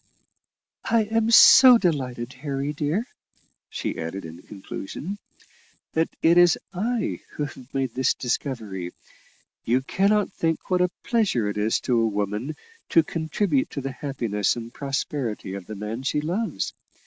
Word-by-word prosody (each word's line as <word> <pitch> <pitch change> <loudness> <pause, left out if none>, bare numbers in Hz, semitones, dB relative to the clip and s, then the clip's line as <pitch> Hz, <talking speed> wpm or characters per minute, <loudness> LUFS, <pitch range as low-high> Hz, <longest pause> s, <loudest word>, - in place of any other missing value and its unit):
"I 225 -1 +4
am 225 +1 0
so 250 +2 +9
delighted, 125 - -2
Harry, 140 0 -2
dear," 150 +10 -1 0.6
she - - -4
added 85 +3 -5
in 80 +2 -10
conclusion, 105 - -7 0.7
"that 160 +1 +1
it 170 +2 +6
is 175 -1 +6 0.2
I 225 +6 -1
who 150 - -3
have 135 -2 -8
made 135 -3 -2
this 130 0 +1
discovery: 110 -8 -3 0.7
you 125 +3 +2
cannot 200 +7 +2
think 165 +2 -2
what 180 0 +3
a 180 - +3
pleasure 210 - +1
it 105 - -3
is 110 +2 +1
to 120 -2 +1
a 115 - +2
woman 105 +7 -2 0.3
to 165 - +5
contribute 160 -1 -1
to 140 - -5
the 135 +1 -4
happiness 115 -8 -1
and 115 0 -8
prosperity 135 -7 -3
of 95 -2 -7
the 110 - -6
man 105 +4 -5
she 140 +2 0
loves. 180 +9 -2
135 Hz, 150 wpm, -24 LUFS, 115-175 Hz, 0.7 s, so